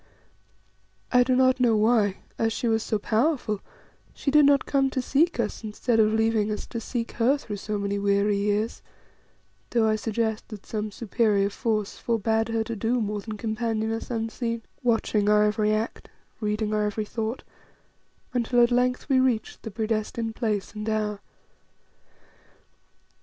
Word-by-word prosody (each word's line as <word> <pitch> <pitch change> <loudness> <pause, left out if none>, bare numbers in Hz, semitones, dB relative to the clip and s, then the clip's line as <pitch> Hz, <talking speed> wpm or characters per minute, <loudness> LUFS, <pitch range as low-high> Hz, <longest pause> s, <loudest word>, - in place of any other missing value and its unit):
I 250 - +6
do 255 +1 +3
not 260 0 +4
know 240 -3 +4
why, 210 -3 +3 0.2
as 225 0 +2
she 240 - -2
was 225 -1 +2
so 215 - -1
powerful, 225 0 0 0.6
she 275 - -1
did 300 0 +6
not 280 -2 +4
come 275 -1 +2
to 265 - -2
seek 285 +5 +1
us, 225 0 -2
instead 225 +2 0
of 215 -1 +5
leaving 220 -1 +1
us 210 - -4
to 230 - -3
seek 235 0 -3
her 250 +5 +2
through 210 -7 -6
so 210 +1 -3
many 200 0 -2
weary 200 +1 +2
years, 210 +2 -1 0.9
though 230 -2 +2
I 215 - +3
suggest 220 0 -2
that 215 -3 -10
some 215 -1 -3
superior 205 -2 +1
force 215 -2 -2
forbade 225 -1 0
her 225 -1 0
to 230 +1 -5
do 230 +4 0
more 210 -1 -2
than 215 0 -6
companion 220 0 -1
us 225 - -4
unseen, 230 0 -3 0.2
watching 225 -3 +1
our 210 0 +5
every 210 0 +2
act, 215 +2 -2 0.3
reading 210 0 -1
our 210 0 +1
every 210 +1 -2
thought, 225 +3 -4 0.9
until 245 0 +3
at 240 - +3
length 250 +1 +1
we 265 -3 +4
reached 255 -4 0
the - - -6
predestined 220 +1 -2
place 215 -5 -2
and 210 0 -4
hour. 210 -1 -1
220 Hz, 165 wpm, -26 LUFS, 210-235 Hz, 0.9 s, I